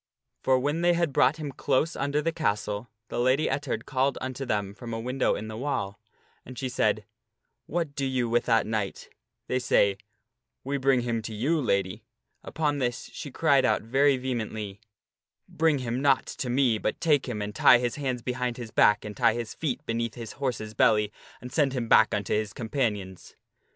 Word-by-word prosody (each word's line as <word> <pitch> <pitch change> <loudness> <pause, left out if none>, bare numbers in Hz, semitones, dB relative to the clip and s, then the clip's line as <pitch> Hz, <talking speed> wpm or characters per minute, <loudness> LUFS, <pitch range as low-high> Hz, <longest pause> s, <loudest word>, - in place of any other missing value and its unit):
For 130 -1 +3
when 145 +5 -1
they 175 0 +4
had 170 -4 0
brought 130 +5 +4
him 150 -3 -5
close 150 +4 0
under 145 +2 -1
the 165 - +1
castle, 105 -7 -2 0.2
the - - -3
Lady 130 +5 +3
Ettard 145 -2 -2
called 135 0 0
unto 130 +1 -5
them 100 -4 -1
from 115 +3 -7
a - - -3
window 125 +3 0
in 110 - -5
the 110 - -6
wall. 110 -6 -3 0.4
And 130 0 -11
she 130 +1 -2
said, 110 -3 +1 0.6
"What 165 -3 -2
do 140 - -3
you 130 -2 0
with 120 +1 +1
that 115 -2 +3
knight?" 105 -3 -3 0.4
They 130 - 0
say, 100 -5 +2 0.3
" 115 +1 -57
We 140 +2 -1
bring 130 -1 +3
him 120 -1 -1
to 110 0 -6
you, 150 +9 +1
Lady." 100 -6 0 0.4
Upon 150 -2 -1
this 120 -2 -2
she 145 - -6
cried 140 0 +3
out 130 - +2
very 135 +4 +3
vehemently, 110 -5 -4 0.4
" - - -67 0.2
Bring 160 -2 +2
him 125 -1 -2
not 140 -2 +3
to 125 - -5
me, 125 -3 +2
but 110 - -2
take 150 -5 +2
him 110 -3 -3
and 105 0 -4
tie 125 - +7
his 120 -1 -1
hands 130 -4 -2
behind 125 -1 -2
his 115 -3 -7
back 105 0 +4
and 105 -1 -6
tie 115 -3 +3
his 120 -2 -4
feet 145 -6 -3
beneath 115 -1 -2
his 115 -3 -7
horse's 120 -6 -3
belly, 105 -1 +3 0.3
and 125 +1 -8
send 145 -4 +2
him 120 -3 -2
back - - +6
unto 105 -1 -1
his 105 -1 -1
companions." 105 -6 -3
125 Hz, 195 wpm, -27 LUFS, 110-140 Hz, 0.6 s, tie